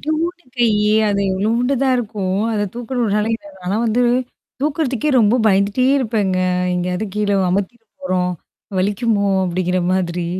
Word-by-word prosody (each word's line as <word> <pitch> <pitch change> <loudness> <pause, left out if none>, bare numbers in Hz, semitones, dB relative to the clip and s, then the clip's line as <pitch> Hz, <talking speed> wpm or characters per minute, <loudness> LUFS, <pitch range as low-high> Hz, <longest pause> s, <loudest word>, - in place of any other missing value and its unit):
இத்தூன்டு 335 +3 -2
கையி, 215 -3 +2 0.2
அது 200 -1 0
இவ்ளூண்டு 230 +7 +1
தான் 265 -1 +3
இருக்கும். 205 -5 -2
அத 210 -1 0
தூக்கறனால 230 -3 -1 0.4
ஆனா 185 - -1
வந்து 230 +2 +2 0.6
தூக்குறதுக்கே 290 -2 0
ரொம்ப 215 +1 +4
பயந்துட்டே 200 +5 +2
இருப்பேங்க. 210 -7 0 0.4
எங்கேயாவது 180 +3 -2
கீழ 210 -1 0 0.2
அமித்திற 200 +5 -2 0.2
போறோம். 180 -7 0 0.5
வலிக்குமோ! 205 +2 +1 0.2
அப்படிங்கிற 180 0 -1
மாதிரி. 175 -2 -1
210 Hz, 120 wpm, -19 LUFS, 190-245 Hz, 0.6 s, ரொம்ப